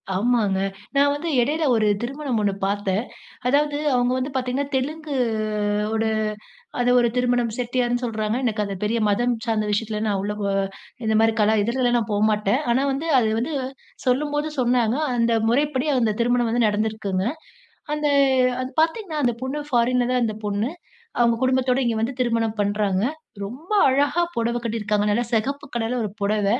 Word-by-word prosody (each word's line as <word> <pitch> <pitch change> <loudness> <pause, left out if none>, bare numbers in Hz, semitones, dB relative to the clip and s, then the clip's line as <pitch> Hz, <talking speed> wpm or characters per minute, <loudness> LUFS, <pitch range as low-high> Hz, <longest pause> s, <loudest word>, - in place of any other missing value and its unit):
ஆமாங்க. 210 -2 +1 0.4
நான் 285 +1 +4
வந்து 305 +4 -3
இடையில 300 +6 0
ஒரு 215 -2 +2
திருமணம் 270 0 -2
ஒண்ணு 205 -1 +1
பார்த்தேன். 200 +1 -1 0.5
அதாவது 290 +2 +2 0.2
அவுங்க 245 0 +2
வந்து 260 +3 -2
பார்த்தீங்கன்னா, 260 +2 -1
தெலுங்கு 300 +3 -3 0.8
ஓட 225 0 0
ஒரு 220 - +1 0.7
அது 245 0 +3
ஒரு 240 -1 +3
திருமணம் 245 -2 +1
செட்டியார்ன்னு 245 0 -1
சொல்றாங்க. 220 -1 -1
எனக்கு 220 -3 0
அது 200 -1 -4
பெரிய 230 +2 0
மதம் 240 +4 +2
சார்ந்த 220 -2 0
விஷயத்தில 210 0 -1
நான் 200 -2 0
உள்ளபோ 210 0 -3 0.6
இந்தமாரி 220 +1 +3
கலா 215 +1 +4
இதுலலாம் 245 +2 +1
நான் 225 - -2
போ 205 - +1
மாட்டேன். 210 +5 +1
ஆனா 260 - +2
வந்து 280 +5 -3
அது 225 -3 +2
வந்து 270 +7 -2 0.5
சொல்லும்போது 295 +4 0
சொன்னாங்க, 240 -1 +2 0.2
அந்த 230 -1 +2 0.2
முறைப்படி 285 +2 +1
அந்த 220 -3 +1
திருமணம் 240 0 +2
வந்து 235 0 +2
நடந்திருக்குங்க. 210 -2 -1 0.7
அந்த 300 0 -1 0.6
அது 255 - -5
பார்த்தீங்கன்னா, 325 0 -2
அந்த 240 -1 +2
பொண்ணு 265 +3 -2
ஃபாரின் 245 0 +2
தான் 250 -1 +2
அந்த 215 -1 -1
பொண்ணு. 205 +3 -1 0.5
அவுங்க 235 -1 +3
குடும்பத்தோட 260 0 +2
இங்கே 230 -2 0
வந்து 230 +4 -1
திருமணம் 230 -3 0
பண்றாங்க. 205 -2 0 0.4
ரொம்ப 260 - -8 0.2
அழகா 285 +5 +2
புடவ 235 +1 -1
கட்டியிருக்காங்க. 210 -2 0
நல்லா 235 +4 +1
சிகப்பு 275 +5 -1
கலர்ல 235 +1 -1
ஒரு 210 - -3
புடவ. 205 0 +1
240 Hz, 160 wpm, -23 LUFS, 215-260 Hz, 0.8 s, நான்